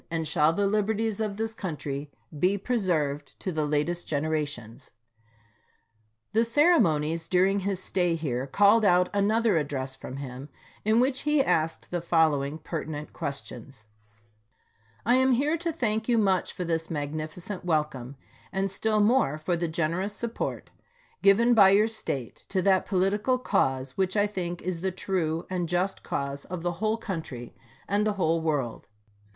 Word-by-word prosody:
and 165 -1 -2
shall 150 +1 +3
the 200 +5 0
liberties 215 +1 0
of 210 -2 -2
this 225 0 -2
country 150 -8 -5 0.3
be 190 +5 +3
preserved 155 - -1
to 185 - -3
the 155 -3 -1
latest 150 +4 -1
generations. 145 -8 -3 1.4
The 225 +1 +4
ceremonies 170 - +3
during 190 +3 +3
his 195 -1 -2
stay 180 -2 0
here 135 -5 -2
called 205 +8 +4
out 180 -2 +4
another 210 0 +2
address 135 -3 -3
from 130 - -8
him, 135 +1 -7 0.3
in 220 +2 +3
which 260 +1 +2
he 295 -2 +2
asked 160 -8 -1
the 175 -1 -1
following 155 -4 +2
pertinent 155 -1 -6
questions: 135 -3 -6 1.2
I 245 +3 +4
am 260 0 +4
here 290 +6 +2
to 335 +1 -2
thank 220 -7 -1
you 235 - +4
much 195 -4 +2
for 180 - -5
this 165 -1 -2
magnificent 155 +5 -4
wel 160 -4 +2
come, 130 -3 -10 0.4
and 195 0 -1
still 215 +2 +1
more 210 - +3
for 165 +3 -1
the 170 0 -1
generous 170 +5 -1
support 235 +1 -4 0.5
given 230 +5 +5
by 200 -4 +7
your 205 +3 +5
State 140 - -4
to 185 -2 0
that 190 -1 +3
political 205 +6 +1
cause 130 - 0
which 190 +1 0
I 205 - +4
think 175 -4 -4
is 180 -2 -3
the 190 0 0
true 170 -3 -2
and 180 -3 -2
just 180 +2 0
cause 140 0 -4
of 180 -2 -6
the 175 - 0
whole 220 +1 +1
country 160 - -6 0.3
and 205 +1 +2
the 210 - +1
whole 165 -4 +1
world. 145 -7 -2
180 Hz, 155 wpm, -27 LUFS, 155-210 Hz, 1.4 s, by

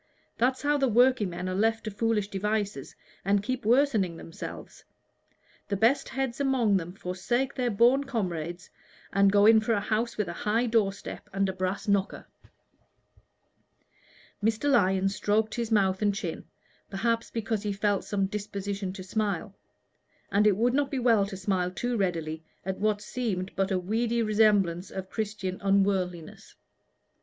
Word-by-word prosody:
That's 260 +3 +1
how 290 0 +2
the 270 - +3
workingmen 215 -7 +2
are 185 - -2
left 225 +3 +1
to 215 - -4
foolish 210 0 0
devices 205 -6 -2 0.3
and 200 +1 +2
keep 255 0 -3
worsening 225 - +3
themselves: 165 - -9 0.8
the 200 - -1
best 255 +7 +2
heads 265 -1 -3
among 255 -7 +2
them 175 -1 -5
forsake 195 +9 -2
their 250 -2 -1
boon 240 +6 +4
comrades, 175 - -4 0.4
and 200 0 +4
go 205 0 +5
in 220 0 +7
for 220 +1 0
a 205 - +2
house 220 +3 -1
with 210 -3 0
a 170 - -4
high 220 +7 0
door 220 -4 +2
step 195 - -9
and 195 0 0
a - - -2
brass 185 +2 -3
knocker." 200 -1 0 2.2
Mr. 225 +6 +1
Lyon 195 -6 +3
stroked 210 +2 0
his 235 0 -3
mouth 195 -2 +2
and 205 -1 +2
chin, 185 -6 -5 0.4
perhaps 230 +3 -1
because 220 -2 -2
he 210 -1 -2
felt 200 0 0
some 195 -2 -1
disposition 200 -1 -4
to 190 -1 -8
smile; 200 0 -2 0.8
and 210 +2 +4
it 200 -3 +3
would 240 +3 +2
not 285 0 +1
be 275 - -3
well 230 -5 +3
to 195 -1 -7
smile 185 -2 0
too 245 +7 -2
readily 165 -6 -2 0.2
at 190 0 -3
what 210 0 +1
seemed 205 -7 -3
but 195 0 0
a 190 - +1
weedy 230 +5 0
resemblance 205 -5 +2
of 190 0 -7
Christian 205 -4 -4
unworldliness. 195 -4 0
205 Hz, 160 wpm, -28 LUFS, 190-230 Hz, 2.2 s, in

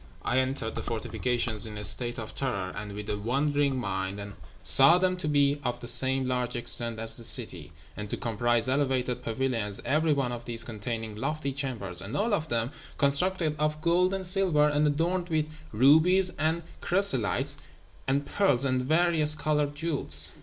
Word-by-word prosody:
I 130 - +1
entered 130 -3 -2
the - - -5
fortifications 115 -1 -1
in 105 -1 -8
a 105 - -6
state 120 +4 0
of 110 -3 -7
terror 100 -9 -3
and 105 0 -7
with 105 0 -7
a 105 - -3
wandering 140 +4 0
mind, 95 -4 -3
and 100 0 -8 0.3
saw 135 +6 +7
them 185 0 +1
to 180 - -4
be 145 -1 +2
of 120 -1 -3
the 120 - -8
same 130 +1 +2
large 125 -1 -2
extent 120 -1 0
as 115 0 +1
the 120 - -9
city, 90 - +4 0.2
and 105 -1 -7
to - - -3
comprise 120 +1 0
elevated 130 -2 -1
pavilions, 115 -4 -2
every 155 +2 +1
one 135 -4 0
of 120 -1 -7
these 120 -1 -2
containing 110 -1 -6
lofty 140 +4 -3
chambers, 115 -10 -3
and 105 +9 -5
all 215 +2 0
of 160 -6 -1
them 115 +2 -1 0.3
constructed 155 +3 0
of 150 0 -1
gold 175 +3 +2
and 195 -1 -3
silver, 180 -5 +3
and 150 0 +1
adorned 170 +4 -1
with 155 -2 0 0.3
rubies 160 - +4
and 160 +2 0 0.2
chrysolites 175 - +3 0.5
and 140 +2 0
pearls 140 -10 +2
and 130 -1 0
various 155 +1 +2
coloured 150 -2 -1
jewels. 160 -1 -2
130 Hz, 175 wpm, -27 LUFS, 115-155 Hz, 0.5 s, saw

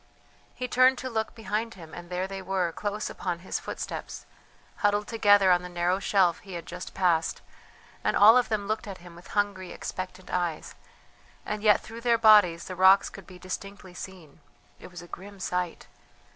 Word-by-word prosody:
He 250 - -4
turned 255 +1 +4
to 260 0 -5
look 220 0 -2
behind 225 0 -3
him 165 -4 -12
and 175 0 -9
there 180 +1 -2
they 195 0 -6
were, 185 -2 -1
close 205 +4 -3
upon 175 -2 -4
his - - -2
footsteps, - - -6 0.5
huddled 205 0 +1
together 205 -4 +5
on 175 0 +4
the 180 - -8
narrow 175 +2 0
shelf 190 -4 +2
he 195 - -11
had 170 -1 -6
just 180 +1 -8
passed; 170 -4 +1 0.6
and - - +1
all 215 +3 +8
of 250 -1 +3
them 210 -2 -1
looked 215 +1 -2
at 195 -2 -6
him 175 -1 -14
with 175 - -14
hungry, 200 -3 -1
expectant 185 0 -7
eyes; 175 -3 -2 0.7
and 210 0 -3
yet 210 -1 +4
through 230 +1 -10
their 235 -1 +3
bodies 205 -7 +6
the 185 - -6
rocks 190 +2 +5
could 195 -3 -12
be 185 - -12
distinctly 190 +1 -7
seen. 175 -5 -10 0.4
It - - -11
was 175 -1 -10
a - - -12
grim 200 +3 -10
sight! 180 -1 -3
190 Hz, 185 wpm, -27 LUFS, 180-210 Hz, 0.7 s, all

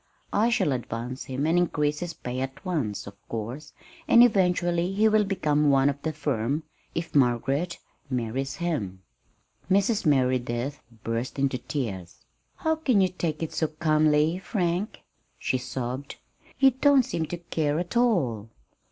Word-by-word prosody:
I 220 +3 +3
shall 225 -10 +2
advance 125 0 -4
him 130 +2 -2
and 165 +3 +3
increase 150 -3 0
his 175 -2 -5
pay 125 +1 -5
at 135 +7 -5
once, 145 - -2
of 100 - -9 0.2
course, 115 +7 -5 0.4
and 235 - +8
eventually 180 -5 +2
he 215 +3 +4
will 215 -1 +4
become 150 -6 +1
one 135 0 +4
of 140 0 -10
the 160 - -1
firm, 145 -1 -1 0.3
if 165 0 -3
Margaret 140 +6 +1 0.3
marries 130 +2 -2
him." 105 - -3 0.7
Mrs. 200 0 +2
Merideth 130 -1 +1 0.2
burst 115 +4 -3
into 135 -2 0
tears. 105 - -5 0.3
"How 320 0 0
can 260 -9 +2
you 190 -1 +4
take 165 -3 -3
it 160 - -4
so 160 - +1
calmly, 155 +1 +2
Frank," 185 0 -2 0.4
she 130 - -1
sobbed. 130 +2 -5 0.4
"You 270 -1 +6
don't 270 +1 +4
seem 165 -10 -3
to 175 - -4
care 155 -3 -1
at 175 +5 -4
all!" 140 - +1
150 Hz, 150 wpm, -26 LUFS, 130-180 Hz, 0.7 s, and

